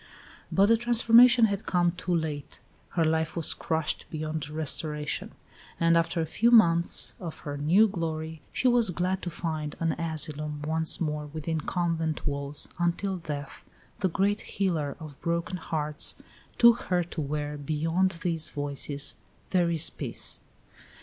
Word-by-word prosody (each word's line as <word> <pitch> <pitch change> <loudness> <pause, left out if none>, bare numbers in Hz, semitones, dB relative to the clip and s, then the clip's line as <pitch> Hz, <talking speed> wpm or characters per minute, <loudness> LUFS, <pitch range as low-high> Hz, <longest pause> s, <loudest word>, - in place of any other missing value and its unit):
But 195 - +4
the 230 +2 +4
transformation 235 0 +6
had 200 -1 -2
come 175 -1 +2
too 180 0 -2
late; 150 -4 -4 0.4
her 165 - +3
life 160 0 0
was 165 -3 +2
crushed 160 -1 -2
beyond 155 -1 -4
restoration; 150 -1 -2 0.5
and 165 0 +4
after 165 0 +1
a - - 0
few 220 +9 +1
months 170 -8 +5
of 165 -3 -7
her 145 -1 -5
new 170 +10 +4
glory 160 -4 -4
she 260 - 0
was 240 -4 +4
glad 180 +2 -1
to 175 - -4
find 155 -3 -4
an 165 -1 +1
asylum 150 -2 -2
once 160 +1 +1
more 150 -2 -2
within 155 +1 -3
convent 165 -2 -2
walls, 140 0 -2
until 175 +3 0
Death, 145 -4 -6 0.4
the 190 - +1
great 200 +4 0
healer 165 -8 -2
of 155 -4 -11
broken 170 +2 -2
hearts, 150 -3 -1 0.4
took 235 0 +6
her 180 -1 +1
to 165 -1 -6
where, 150 0 -3
"beyond 160 +5 0
these 165 -3 -1
voices, 145 0 -2 0.4
there 175 -2 +2
is 165 -1 +3
peace." - - 0
165 Hz, 150 wpm, -27 LUFS, 150-180 Hz, 0.5 s, transformation